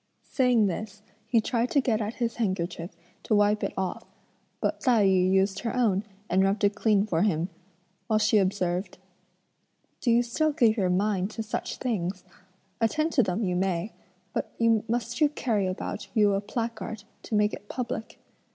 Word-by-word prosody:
Saying 250 -5 +3
this, 205 +2 -4 0.2
he 235 - +3
tried 235 +2 0
to 285 - +3
get 230 -4 +1
at 215 +2 -3
his 230 -2 -2
handkerchief 175 -5 -2 0.3
to 215 - +1
wipe 205 +1 +3
it - - -1
off; 190 -1 -2 0.6
but - - -1
Tai 235 -6 +4
yü 185 -1 +3
used 195 +1 +2
her 235 0 -3
own 215 -6 +2 0.2
and 185 +2 +2
rubbed 200 +2 +1
it 205 0 +4
clean 210 -1 +2
for 170 -6 0
him, 180 -3 +1 0.6
while 220 -2 +2
she 215 0 +4
observed: 185 -1 -1 1.0
"Do 245 - -1
you 235 +1 +5
still 305 +6 0
give 235 -7 +4
your 190 -5 +1
mind 190 +1 +1
to 225 0 -5
such 215 - -4
things? 185 -6 -2 0.6
attend 310 +9 +1
to 255 - +5
them 200 0 -1
you 180 -2 0
may; 185 +2 -1 0.4
but - - -2
must 230 +2 +1
you 300 - +6
carry 225 -9 0
about 185 +1 -4
you 205 -2 +4
a 195 - 0
placard 220 -1 -4 0.2
(to 220 - -4
make 210 0 +3
it 205 - -9
public)? 245 -3 -4
210 Hz, 175 wpm, -27 LUFS, 190-230 Hz, 1.0 s, you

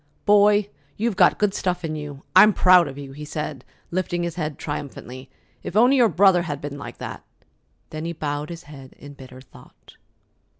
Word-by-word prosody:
"Boy, 205 0 +4 0.3
you've 225 -1 -1
got 185 -2 +4
good 210 -2 +1
stuff 180 -3 -2
in 155 -1 -4
you! 145 -2 -8
I'm 210 +3 +8
proud 180 -3 +5
of 135 0 -8
you," 140 -1 -8
he 150 +2 -9
said, 150 -3 -5 0.3
lifting 175 -1 -2
his 170 -1 -3
head 155 -4 -4
triumphantly. 135 -3 -7 0.3
"If - - -7
only 245 +5 +5
your 240 -3 +5
brother 185 0 +4
had 150 -5 -5
been 145 0 -7
like - - -9
that!" - - -8 0.7
Then 155 +1 -6
he 170 - -3
bowed 150 -1 -4
his 170 -1 -8
head 135 -3 -13
in 145 0 -12
bitter 130 -2 -13
thought. 130 - -19
155 Hz, 185 wpm, -23 LUFS, 145-185 Hz, 0.7 s, I'm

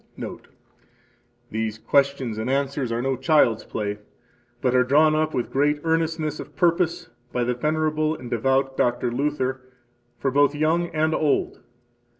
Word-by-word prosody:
Note: - - -7 1.0
These 110 0 -2
questions 135 -3 +1
and 110 - -2
answers 135 -2 -1
are 115 +1 -1
no 135 0 0
child's 130 -8 +3
play, 105 -1 -4 0.6
but 125 - +1
are 125 0 +5
drawn 150 +4 +4
up 155 0 0
with 120 - -2
great 145 +2 +2
earnestness 160 -2 -1
of - - -9
purpose 170 -1 +1 0.2
by 125 - 0
the 125 +1 0
venerable 155 +3 0
and 125 - -9
devout 135 +3 +1
Dr. 120 -1 0
Luther 130 0 -1 0.6
for 135 - -1
both 145 +1 +3
young 160 +3 +1
and 160 -1 0
old. 150 -2 0
140 Hz, 150 wpm, -24 LUFS, 125-155 Hz, 1.0 s, are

